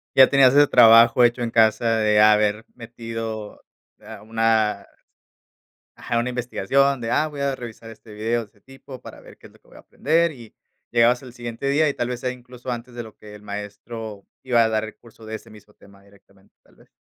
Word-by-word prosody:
Ya 130 Hz, -1 st, +7 dB
tenías 135 Hz, -2 st, +5 dB
ese 145 Hz, 0 st, +5 dB
trabajo 115 Hz, 0 st, +6 dB
hecho 120 Hz, +1 st, +2 dB
en 115 Hz, -, -3 dB
casa 115 Hz, 0 st, +2 dB
de 105 Hz, -1 st, +2 dB
haber 105 Hz, +1 st, +3 dB
metido 115 Hz, -2 st, -7 dB, 0.4 s
a -, -, -11 dB
una 110 Hz, -2 st, 0 dB, 1.1 s
Ajá, 115 Hz, -, -2 dB
una 120 Hz, -, -2 dB
investigación 125 Hz, +2 st, 0 dB
de: 115 Hz, -1 st, -5 dB
"Ah, 155 Hz, -, +1 dB
voy 145 Hz, -2 st, -10 dB
a 140 Hz, -1 st, -1 dB
revisar 115 Hz, -2 st, -10 dB
este 110 Hz, 0 st, -15 dB
video, 115 Hz, +2 st, -2 dB
ese 105 Hz, 0 st, -21 dB
tipo, 135 Hz, 0 st, -13 dB
para -, -, -12 dB
ver -, -, -16 dB
qué -, -, -16 dB
es -, -, -24 dB
lo -, -, -23 dB
que -, -, -31 dB
voy -, -, -17 dB
a -, -, -14 dB
aprender", 165 Hz, +3 st, 0 dB
y 115 Hz, -4 st, -14 dB, 0.4 s
llegabas 120 Hz, +2 st, +3 dB
el 125 Hz, -, -11 dB
siguiente 120 Hz, +2 st, -5 dB
día, 150 Hz, +2 st, +2 dB
y 140 Hz, -, -1 dB
tal 120 Hz, 0 st, -3 dB
vez 125 Hz, -, -4 dB
sea 125 Hz, 0 st, -3 dB
incluso 125 Hz, 0 st, -11 dB
antes 120 Hz, 0 st, -6 dB
de 120 Hz, -, -6 dB
lo 110 Hz, -1 st, -14 dB
que 105 Hz, -1 st, -14 dB
el 105 Hz, -, -13 dB
maestro 105 Hz, +1 st, -8 dB, 0.2 s
iba 120 Hz, -3 st, +2 dB
a 115 Hz, -, +3 dB
dar 110 Hz, -1 st, -1 dB
el 110 Hz, -, -9 dB
curso 115 Hz, -1 st, -18 dB
de 110 Hz, 0 st, -6 dB
ese -, -, -12 dB
mismo 105 Hz, 0 st, -17 dB
tema 100 Hz, -1 st, -21 dB
directamente, 100 Hz, -1 st, -25 dB
tal -, -, -27 dB
vez. -, -, -24 dB
115 Hz, 215 wpm, -22 LUFS, 110-125 Hz, 1.1 s, Ya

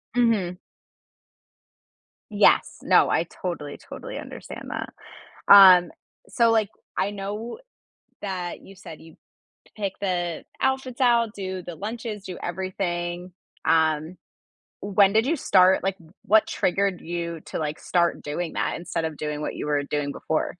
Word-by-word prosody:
Mhm. 210 Hz, -7 st, +2 dB, 1.7 s
Yes, -, -, +3 dB
no, -, -, +4 dB
I -, -, +2 dB
totally, 155 Hz, -6 st, -6 dB
totally -, -, -9 dB
understand -, -, -9 dB
that. -, -, -4 dB, 0.6 s
Um, 185 Hz, -3 st, +9 dB, 0.4 s
so, 235 Hz, -2 st, +3 dB
like, 220 Hz, -3 st, +2 dB, 0.3 s
I 200 Hz, -, +1 dB
know 205 Hz, -, -5 dB, 0.6 s
that 185 Hz, -3 st, -4 dB
you 195 Hz, -, -14 dB
said 160 Hz, -5 st, -11 dB
you 160 Hz, -1 st, -15 dB, 0.6 s
pick 200 Hz, -3 st, -3 dB
the 175 Hz, -4 st, -2 dB, 0.2 s
outfits 265 Hz, -1 st, -1 dB
out, 235 Hz, -3 st, +3 dB
do 190 Hz, -2 st, -5 dB
the 175 Hz, -1 st, -8 dB
lunches, 215 Hz, +1 st, -5 dB
do 180 Hz, -, -7 dB
everything, 175 Hz, -1 st, -3 dB, 0.3 s
um, 160 Hz, +1 st, +2 dB, 0.6 s
when 200 Hz, 0 st, +3 dB
did 220 Hz, +3 st, +3 dB
you 325 Hz, -, +2 dB
start? 190 Hz, -, +4 dB
Like, 195 Hz, 0 st, -1 dB, 0.3 s
what 215 Hz, +1 st, +4 dB
triggered 195 Hz, 0 st, 0 dB
you 170 Hz, -1 st, -4 dB
to, -, -, -5 dB
like, 155 Hz, -1 st, -3 dB
start 170 Hz, -1 st, +1 dB
doing 160 Hz, +3 st, -4 dB
that -, -, -1 dB
instead 170 Hz, -1 st, -4 dB
of 160 Hz, -2 st, -3 dB
doing 150 Hz, 0 st, -4 dB
what -, -, -3 dB
you -, -, -4 dB
were 145 Hz, -1 st, +1 dB
doing 145 Hz, -1 st, -2 dB
before? 155 Hz, -, -1 dB
185 Hz, 140 wpm, -24 LUFS, 170-205 Hz, 1.7 s, Um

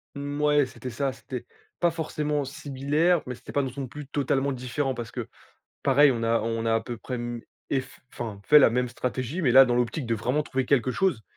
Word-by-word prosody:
Mouais, 145 Hz, 0 st, +1 dB
c'était 125 Hz, 0 st, -8 dB
ça, 135 Hz, +3 st, -1 dB
c'était 125 Hz, -2 st, -7 dB, 0.3 s
pas 175 Hz, -, +4 dB
forcément 150 Hz, -3 st, -2 dB
similaire, 145 Hz, +5 st, 0 dB
mais 125 Hz, -, -4 dB
c'était -, -, -11 dB
pas 140 Hz, -, +1 dB
non 135 Hz, -, -2 dB
son 135 Hz, -1 st, -5 dB
plus 145 Hz, +3 st, -8 dB
totalement 140 Hz, -1 st, 0 dB
différent 130 Hz, +2 st, -2 dB
parce 120 Hz, -3 st, -6 dB
que, -, -, -5 dB, 0.6 s
pareil, 140 Hz, +1 st, +6 dB
on 115 Hz, -1 st, -3 dB
a 115 Hz, 0 st, +2 dB
on 115 Hz, 0 st, -2 dB
a 115 Hz, -, +3 dB
à 115 Hz, -, +2 dB
peu 120 Hz, 0 st, -6 dB
près 125 Hz, -, -6 dB
m 120 Hz, -1 st, -4 dB, 0.3 s
ef 130 Hz, -1 st, -3 dB
enfin, 110 Hz, -4 st, -6 dB
fait 150 Hz, -, +8 dB
la 140 Hz, -, +7 dB
même 125 Hz, +1 st, 0 dB
stratégie. 130 Hz, +6 st, -3 dB
Mais 135 Hz, -8 st, +2 dB
là, 135 Hz, +2 st, +10 dB
dans 120 Hz, -1 st, +1 dB
l'optique 125 Hz, +4 st, 0 dB
de 115 Hz, -, +1 dB
vraiment 125 Hz, +7 st, 0 dB
trouver 130 Hz, -3 st, -2 dB
quelque 130 Hz, -3 st, +2 dB
chose. 160 Hz, -, 0 dB
130 Hz, 215 wpm, -26 LUFS, 120-145 Hz, 0.6 s, là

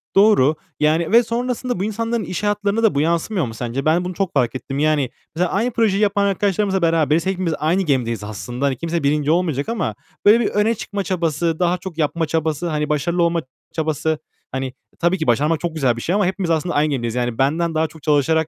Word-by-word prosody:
doğru. 195 Hz, -8 st, +5 dB, 0.2 s
Yani 160 Hz, +3 st, +2 dB
ve 235 Hz, +2 st, +6 dB
sonrasında 245 Hz, -1 st, -2 dB
bu -, -, 0 dB
insanların 230 Hz, +2 st, -1 dB
iş 185 Hz, +2 st, -4 dB
hayatlarına 205 Hz, +1 st, 0 dB
da 220 Hz, -, +3 dB
bu 140 Hz, -, +2 dB
yansımıyor 170 Hz, +3 st, 0 dB
mu 115 Hz, -, -6 dB
sence? 120 Hz, +4 st, -4 dB
Ben 165 Hz, +3 st, +2 dB
bunu 180 Hz, -, -3 dB
çok 190 Hz, 0 st, -2 dB
fark 120 Hz, -1 st, +1 dB
ettim. 135 Hz, +1 st, -4 dB
Yani 150 Hz, -4 st, +2 dB, 0.3 s
mesela 175 Hz, +1 st, 0 dB
aynı 230 Hz, +6 st, 0 dB
projeyi 215 Hz, -3 st, +1 dB
yapan 200 Hz, -1 st, +2 dB
arkadaşlarımızla 195 Hz, -1 st, +1 dB
beraberiz, 165 Hz, -1 st, +2 dB
hepimiz 185 Hz, -3 st, -1 dB
aynı 170 Hz, +5 st, +1 dB
gemideyiz 120 Hz, -, 0 dB
aslında. 120 Hz, +6 st, -3 dB
Kimse 165 Hz, +4 st, -3 dB
1. 150 Hz, +1 st, +2 dB
olmayacak 165 Hz, -, 0 dB
ama 230 Hz, -1 st, -2 dB, 0.3 s
böyle 210 Hz, +3 st, +7 dB
bir 230 Hz, -, +1 dB
öne 210 Hz, +3 st, +1 dB
çıkma 200 Hz, -1 st, -4 dB
çabası, 170 Hz, -3 st, -1 dB
daha 180 Hz, 0 st, +2 dB
çok 180 Hz, -2 st, -8 dB
yapma 165 Hz, +1 st, 0 dB
çabası, 160 Hz, +1 st, -1 dB
hani 150 Hz, -2 st, -1 dB
başarılı 170 Hz, +4 st, +1 dB
olma 170 Hz, 0 st, +1 dB, 0.3 s
çabası 155 Hz, -1 st, -1 dB, 0.3 s
Hani 130 Hz, -1 st, -3 dB, 0.3 s
tabii 175 Hz, +2 st, +2 dB
ki 160 Hz, -, -3 dB
başarmak 150 Hz, +6 st, +2 dB
çok 170 Hz, 0 st, -3 dB
güzel 130 Hz, -6 st, +2 dB
bir -, -, -5 dB
şey 180 Hz, +9 st, 0 dB
ama 205 Hz, -, +2 dB
hepimiz 185 Hz, -1 st, -1 dB
aslında 165 Hz, +2 st, 0 dB
aynı 150 Hz, +1 st, +3 dB
gemideyiz. 120 Hz, -4 st, -2 dB
Yani 120 Hz, -2 st, -1 dB
benden 160 Hz, +5 st, +1 dB
daha 160 Hz, 0 st, +2 dB
çok 160 Hz, -1 st, -16 dB
çalışarak 155 Hz, +1 st, +2 dB
165 Hz, 210 wpm, -20 LUFS, 150-195 Hz, 0.3 s, böyle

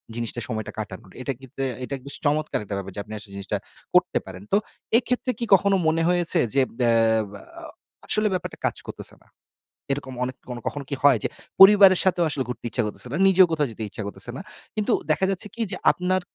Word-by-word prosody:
জিনিসটা 120 Hz, 0 st, -3 dB
সময়টা 110 Hz, -2 st, -4 dB
কাটানোর। 100 Hz, -3 st, -7 dB
এটা 135 Hz, -, -2 dB
কিন্তু 135 Hz, 0 st, -15 dB, 0.2 s
এটা 135 Hz, -, -5 dB
কিন্তু 140 Hz, +2 st, -9 dB
চমৎকার 150 Hz, +1 st, +1 dB
একটা 100 Hz, 0 st, -5 dB
ব্যাপার, 95 Hz, 0 st, -6 dB
যে -, -, -5 dB
আপনি 110 Hz, -, -10 dB
আসলে 105 Hz, -1 st, -11 dB
জিনিসটা 100 Hz, -1 st, -3 dB, 0.4 s
করতে -, -, +4 dB
পারেন। 95 Hz, 0 st, -10 dB
তো 200 Hz, -, +5 dB, 0.4 s
এক্ষেত্রে 250 Hz, +1 st, 0 dB
কি 235 Hz, -, -1 dB
কখনো 195 Hz, +1 st, +5 dB
মনে 165 Hz, +1 st, +2 dB
হয়েছে, 175 Hz, -1 st, +2 dB
যে 140 Hz, -, +4 dB, 0.2 s
অ্যা 120 Hz, -, +4 dB, 0.7 s
আ -, -, -11 dB, 0.4 s
আসলে 215 Hz, 0 st, +3 dB
ব্যাপারটা 185 Hz, -, -4 dB
কাজ -, -, 0 dB
করতেছে -, -, -4 dB
না? -, -, -29 dB, 0.7 s
এরকম 135 Hz, -2 st, -4 dB
অনেক 130 Hz, 0 st, -5 dB, 0.3 s
কখন 145 Hz, -, -3 dB
কি -, -, -2 dB
হয়, 140 Hz, -5 st, +6 dB
যে -, -, 0 dB, 0.3 s
পরিবারের 195 Hz, -2 st, +9 dB
সাথেও 175 Hz, -2 st, +2 dB
আসলে 140 Hz, -2 st, 0 dB
ঘুরতে 125 Hz, -, -6 dB
ইচ্ছা 120 Hz, -, 0 dB
করতেছে 105 Hz, +3 st, -3 dB
না? -, -, -1 dB
নিজেও 190 Hz, -1 st, +7 dB
কোথাও 150 Hz, -4 st, +1 dB
যেতে 110 Hz, -, -8 dB
ইচ্ছা 105 Hz, -, -7 dB
করতেছে 100 Hz, +3 st, -5 dB
না। 150 Hz, -, -6 dB, 0.3 s
কিন্তু 215 Hz, -2 st, 0 dB, 0.2 s
দেখা 190 Hz, -, +2 dB
যাচ্ছে 195 Hz, +1 st, -2 dB
কি 235 Hz, -, -3 dB
যে -, -, -3 dB, 0.2 s
আপনার 185 Hz, +1 st, 0 dB
145 Hz, 200 wpm, -24 LUFS, 110-185 Hz, 0.7 s, পরিবারের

